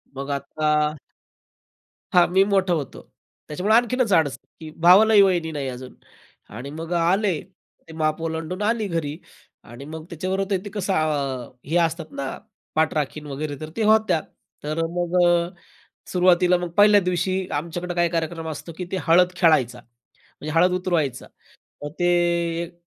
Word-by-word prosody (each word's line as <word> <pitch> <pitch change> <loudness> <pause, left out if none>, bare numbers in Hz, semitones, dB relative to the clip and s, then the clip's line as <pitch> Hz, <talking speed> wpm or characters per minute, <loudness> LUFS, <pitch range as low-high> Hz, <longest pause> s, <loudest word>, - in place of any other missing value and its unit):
मग 140 +1 -6
आता 140 +2 -2 1.5
हां, 175 -1 +6
मी 190 - +6
मोठा 190 -2 +2
होतो, 145 -6 -5 0.5
त्याच्यामुळे 185 +9 0
आणखीनच 245 -2 +1
अडचण, 145 -4 0 0.2
की 155 -1 -8
भावालाही 205 +3 +7
वहिनी 175 -4 +1
नाही 140 -3 -3
अजून 125 0 -8 0.6
आणि 135 +4 -7
मग 165 +2 -6
आले, 185 +4 +2
ते 180 -3 -21
माप 155 0 -1
ओलांडून 165 +4 -4
आली 220 0 0
घरी 160 -3 -3 0.5
आणि 120 +4 -10
मग 155 +1 -8
त्याच्याबरोबर 190 +4 -3
तर 190 -1 -1
ते 205 - -7
कसं 195 -1 -1
अ, 140 -5 -1
हे 160 +4 -2
असतात 165 -1 -4
ना, 135 -1 -4 0.4
पाठराखीण 155 -1 -1
वगैरे 145 +1 -5
तर 155 0 -7
ते 225 - -1
होत्या. 215 -6 +3 0.4
तर 155 +2 -2 0.2
मग, 175 0 -1 1.0
सुरुवातीला 180 0 +4
मग 175 -1 -4
1ल्या 205 0 +6
दिवशी 180 +1 -1 0.2
आमच्याकडं 170 +4 -4
काही 175 -1 +2
कार्यक्रम 165 -1 -3
असतो 160 +2 -7
की 180 - -3
ते 190 - 0
हळद 180 +2 +5
खेळायचा. 130 -9 +2
म्हणजे 120 +5 -13
हळद 180 +1 +4
उतरवायचा, 170 -8 -1 0.6
मग 145 - -5
ते 175 - +1 0.6
एक 170 +1 -10
165 Hz, 150 wpm, -23 LUFS, 150-185 Hz, 1.5 s, भावालाही